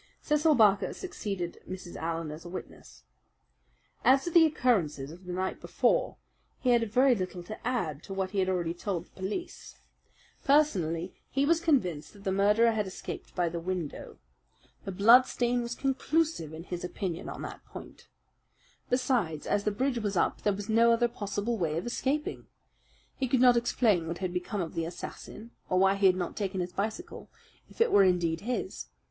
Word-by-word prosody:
Cecil 300 0 +3
Barker 205 -4 +4
succeeded 195 - -5
Mrs. 185 -2 -7
Allen 165 -1 -3
as 155 +2 -9
a 175 - -9
witness. 185 - -10 1.0
As 270 +1 +5
to 345 - -3
the 330 -1 +7
occurrences 165 - 0
of 180 +3 -13
the 180 - -5
night 185 +1 -3
before, - - +1 0.4
he 255 - +2
had 230 -3 +2
very 255 +3 +5
little 185 -4 -4
to 215 +5 -7
add 175 - -1
to 195 - -6
what 190 -1 -2
he 205 - -1
had 190 0 +1
already 175 -3 0
told 175 -1 -3
the - - -30
police. 200 - -6 0.7
Personally, 185 - +2 0.2
he 275 +1 +1
was 335 +2 +3
convinced 180 - 0
that 200 -1 -15
the 190 - 0
murderer 210 +4 +4
had 210 -3 -1
escaped 190 - -8
by 175 -2 +1
the 170 +1 -3
window. 175 -3 -5 0.7
The 195 - -3
bloodstain 240 +4 +4
was 235 0 -4
conclusive, 275 - 0
in 160 +1 -8
his 175 0 -6
opinion, 180 -1 -4
on - - -7
that - - -8
point. - - -12 0.8
Besides, 245 - 0
as 205 0 0
the - - +3
bridge 250 +4 0
was 205 -4 -2
up, - - +1
there 205 - +2
was 205 +1 -6
no 230 +1 +5
other 235 +1 +3
possible 215 0 -3
way 160 -3 0
of 170 - -3
escaping. 270 +5 -2 0.7
He 265 - -1
could 250 +1 +2
not 250 -1 +6
explain 225 -7 +2
what 170 +1 -3
had 185 -2 -3
become 180 +3 -2
of 165 - -4
the 165 - -2
assassin 205 +6 -8 0.2
or 185 - +2
why 195 +1 +5
he 200 0 +4
had 185 - +4
not 180 -2 -3
taken 195 -2 -2
his 180 0 -3
bicycle, 220 - -4 0.4
if - - -18
it 460 -1 +4
were 200 - +6
indeed 175 -3 +2
his. 245 +4 -4
200 Hz, 185 wpm, -29 LUFS, 175-245 Hz, 1.0 s, the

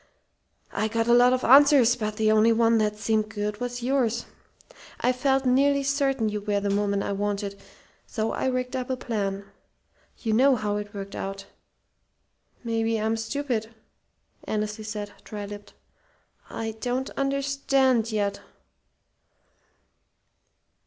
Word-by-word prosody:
I 215 +2 -1
got 225 +1 -1
a 240 - +5
lot 245 +1 +6
of 255 0 0
answers, 270 -2 +6
but 215 -3 -3
the 215 0 +2
only 220 +1 +5
one 230 0 +3
that 210 -1 0
seemed 215 0 0
good 210 0 -4
was 245 0 -4
yours. 245 -3 0 0.7
I 250 - +2
felt 265 +1 +1
nearly 280 +2 +3
certain 270 -4 +1
you 210 0 -3
were 205 0 0
the 200 0 0
woman 200 -1 0
I - - -3
wanted, 200 0 -3 0.5
so 220 -1 -2
I - - -2
rigged 255 0 -2
up 255 0 -3
a 260 - -1
plan. 200 -5 -3 0.7
You 220 -2 -2
know 265 +4 +5
how 210 -2 -2
it 205 0 -7
worked 200 0 -6
out." 195 0 -5 1.2
"Maybe 225 -1 0
I'm 220 +1 0
stupid," 225 -1 -3 0.7
Annesley 215 0 -3
said, 210 -1 -5
dry 205 -1 -6
lipped. 205 0 -10 0.8
"I 225 -1 -4
don't 250 +2 -2
understand 275 -3 +1
yet." 200 -2 -1
225 Hz, 140 wpm, -26 LUFS, 210-255 Hz, 1.2 s, lot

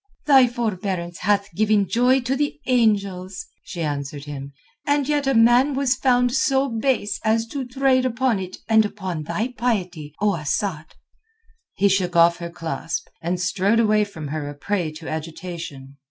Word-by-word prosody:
"Thy 270 -4 +6
forbearance 190 -7 -3
hath 200 0 0
given 210 +1 +2
joy 250 +5 +3
to 250 +2 -1
the 290 +1 -2
angels," 200 -7 0 0.2
she 170 - -6
answered 145 -1 -4
him, 140 -1 -7 0.4
"and 285 -1 +2
yet 295 -2 0
a 270 - +2
man 240 +5 +5
was 270 -2 +2
found 245 -1 +2
so 270 0 +2
base 225 -3 -1
as 225 +1 +2
to 260 +2 -5
trade 260 0 +2
upon 255 -3 +1
it 185 -1 -6
and 220 -1 +5
upon 190 -6 -4
thy 220 - -2
piety, 180 -11 -2
O 210 0 +2
Asad!" 160 0 -3 0.8
He 200 - +3
shook 185 -2 +1
off 170 0 +5
her 170 -1 -6
clasp, 165 -1 -4
and 175 +2 -2
strode 195 +4 +1
away 215 -2 +3
from 160 -8 -7
her 150 -1 -4
a 145 - -8
prey 175 +1 -2
to 155 +1 -10
agitation. 160 -4 -7
205 Hz, 165 wpm, -22 LUFS, 170-245 Hz, 0.8 s, Thy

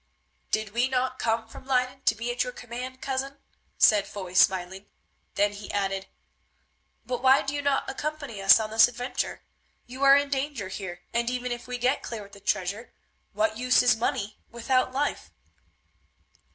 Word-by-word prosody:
"Did 215 -1 -1
we 240 +4 +1
not 255 0 -1
come 225 0 0
from 245 - -13
Leyden 255 0 0
to 220 - +4
be 235 +2 -3
at 245 +1 0
your 250 - -5
command, 250 +2 -7
cousin?" 270 +1 -3 0.4
said 210 -2 +5
Foy 185 -3 -7
smiling. 190 +1 +2 0.5
Then 205 0 +2
he 205 0 -8
added, 195 -1 -2 1.0
"But 250 -1 -3
why 265 +1 +5
do 275 - -3
you 290 - -2
not 285 -1 0
accompany 285 -6 -5
us 195 +2 +8
on 215 -1 -3
this 225 +1 +7
adventure? 245 +1 -4 0.4
You 255 +2 -10
are 275 0 +8
in 285 0 0
danger 270 -7 -2
here, 190 -2 -6
and 235 0 +1
even 250 0 -3
if 240 +1 -5
we 250 0 -4
get 250 +3 +1
clear 225 -3 -6
with 200 - -15
the 200 - -13
treasure, 200 +3 -2 0.4
what 320 -9 0
use 250 0 +4
is 245 -3 +5
money 215 -2 -2
without 255 +2 0
life?" 280 +3 -2
245 Hz, 175 wpm, -27 LUFS, 205-260 Hz, 1.0 s, us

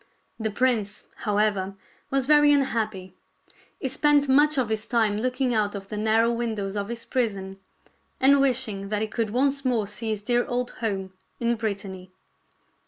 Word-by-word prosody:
The 220 -1 -1
prince, 215 -2 0
however, 205 -2 0 0.3
was 270 -1 +1
very 295 0 +6
unhappy. 220 -9 0 0.7
He 270 - -2
spent 285 +2 +3
much 295 +3 +4
of 250 -4 +1
his 220 0 -2
time 220 -3 +1
looking 255 +1 0
out 210 -2 0
of 195 -1 -8
the - - -5
narrow 220 +2 +2
windows 220 -4 -3
of 200 -1 -2
his 235 0 -6
prison 195 -7 -2 0.6
and 275 +1 +5
wishing 235 -7 0
that 210 0 0
he - - -1
could 225 0 -2
once 275 +4 +1
more 240 -5 +1
see 210 +3 -5
his 210 -2 -2
dear 240 +1 +2
old 245 0 -2
home 195 -4 -2 0.3
in 235 0 +1
Brittany. 200 -5 -5
225 Hz, 165 wpm, -25 LUFS, 205-255 Hz, 0.7 s, very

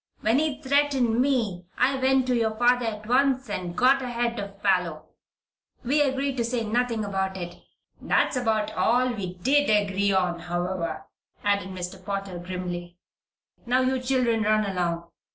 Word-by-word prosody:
When 225 +5 +3
he 300 -2 -1
threatened 270 -4 +2
me 220 -10 0
I 270 +2 +3
went 265 0 +2
to 255 -1 +1
your 220 -2 0
father 245 0 +3
at 215 -1 -5
once 260 -1 +2
and 180 -3 -4
got 265 +2 +4
ahead 240 -2 -2
of 200 -1 -7
Parloe. 180 -5 +1 0.8
We 280 +5 +2
agreed 275 -1 0
to 235 - +1
say 235 0 -1
nothing 230 0 0
about 190 -1 -2
it 175 -1 -6 0.4
that's - - +1
about 220 -3 0
all 250 +2 +2
we 185 -5 -5
did 275 +9 +2
agree 200 -1 +2
on, 180 -3 +1
however," 175 -2 -3 0.4
added 200 -2 +1
Mr. 180 -1 -6
Potter, 195 -3 -4
grimly. 175 -1 -6 0.7
"Now 250 +2 +3
you 260 0 0
children 250 -3 +1
run 215 0 +2
along. 175 -3 -2
220 Hz, 155 wpm, -26 LUFS, 185-255 Hz, 0.8 s, got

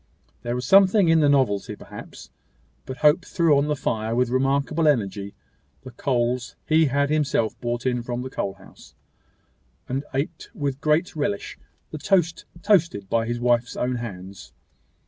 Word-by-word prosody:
There 120 0 -3
was 125 0 -3
something 195 - +5
in 165 0 +5
the 145 -2 +4
novelty, 130 -8 +1
perhaps; - - -12 0.6
but 130 - -6
Hope 150 +5 +5
threw 165 -5 +2
on 140 +1 +2
the 150 - 0
fire 115 -4 -2
with 125 0 +1
remarkable 140 +4 +1
energy 100 -7 0 0.5
the 130 - -9
coals 120 -1 -1
he 160 +1 +4
had 140 +1 +1
himself 145 -7 +1
brought 120 0 -3
in 125 -1 0
from 120 +1 -4
the 130 - -7
coal 100 -6 -3
house, - - -17 0.9
and 135 +2 -2
ate 150 +5 -4
with 140 -5 -3
great 155 +4 +1
relish 145 -10 -3 0.3
the 155 - -6
toast 175 -2 +1 0.2
toasted 165 - +2
by 115 -1 +1
his 120 0 -2
wife's 120 0 +1
own 125 0 -1
hands. 95 -4 -9
130 Hz, 160 wpm, -24 LUFS, 120-155 Hz, 0.9 s, something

